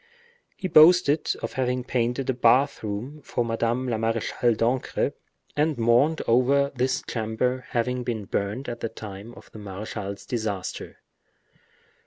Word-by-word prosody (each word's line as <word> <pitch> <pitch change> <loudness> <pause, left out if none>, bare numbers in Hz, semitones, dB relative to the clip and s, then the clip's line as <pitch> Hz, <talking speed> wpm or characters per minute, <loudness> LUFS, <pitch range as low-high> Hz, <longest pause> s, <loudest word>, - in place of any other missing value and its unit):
He 185 - -3
boasted 160 -2 +6
of - - -3
having 125 -1 -1
painted 125 +1 -1
a 130 - +2
bath 130 +4 +3
room 115 +8 -5
for 120 -3 -2
Madame 115 +2 -1
la 115 -3 -1
Marechale 115 +1 0
d'Ancre, 120 +3 0 0.4
and 150 0 +1
mourned 120 +7 +3
over 135 +4 +3
this 130 0 0
chamber 125 +3 -1
having 125 +1 -1
been 110 -4 -3
burnt 105 +8 -3
at 120 -1 -5
the 115 - -3
time 105 +1 -9
of - - -15
the 110 - -10
marechal's 100 0 -6
disaster. 110 -7 -4
120 Hz, 140 wpm, -25 LUFS, 110-130 Hz, 0.4 s, boasted